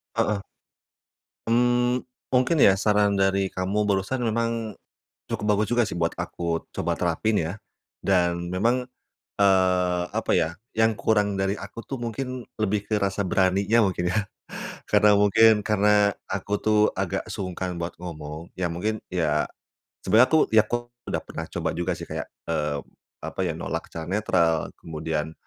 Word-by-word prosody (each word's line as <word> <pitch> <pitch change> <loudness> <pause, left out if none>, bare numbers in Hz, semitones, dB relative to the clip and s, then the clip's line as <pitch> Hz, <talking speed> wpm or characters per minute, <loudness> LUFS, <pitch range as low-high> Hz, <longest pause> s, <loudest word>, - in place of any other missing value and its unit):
Heeh. 100 -2 0 1.0
Mmm, 120 +1 +3 0.3
mungkin 130 +5 +3
ya - - +8
saran 105 -1 +2
dari 95 0 +2
kamu 95 +3 0
barusan 105 +5 0
memang 115 -1 -1 0.5
cukup 105 - -2
bagus 105 +1 0
juga 120 0 +4
sih, - - -5
buat 85 -1 0
aku 85 -1 -3
coba 85 0 -1
terapin 95 +5 +1
ya. 80 +1 -2 0.5
Dan 85 -2 +1
memang, 115 +7 +1 0.5
eee, 90 -2 +3
apa - - -1
ya? 80 +1 0 0.2
Yang 110 0 +4
kurang 105 -1 +1
dari 95 +1 0
aku 115 - -8
tuh 135 - -6
mungkin 125 +1 -4 0.2
lebih 105 0 0
ke 105 -1 0
rasa 100 0 0
beraninya 95 +5 +3
mungkin 95 -3 0
ya - - +2 0.7
karena 105 0 +5
mungkin 105 +2 +5
karena 105 -1 +3
aku 95 +1 -5
tuh 110 0 +1 0.2
agak - - -2
sungkan 90 -1 -4
buat 85 +1 -4
ngomong, 80 -1 -7
iya 90 - -1
mungkin 110 +6 -1 0.2
iya, 75 -4 +1 0.6
sebenernya 110 +6 +5
aku 160 - +6 0.2
ya 110 - +7
kok 120 0 -2 0.2
udah - - 0
pernah - - -6
coba - - -1
juga 85 +1 -1
sih - - -7
kayak, - - -4 0.2
eee, 75 -2 0 0.5
apa - - -7
ya? - - 0
Nolak - - -4
secara 80 -1 -6
netral. 90 -5 +2 0.2
Kemudian, 80 -1 -3
100 Hz, 150 wpm, -25 LUFS, 90-110 Hz, 1.0 s, ya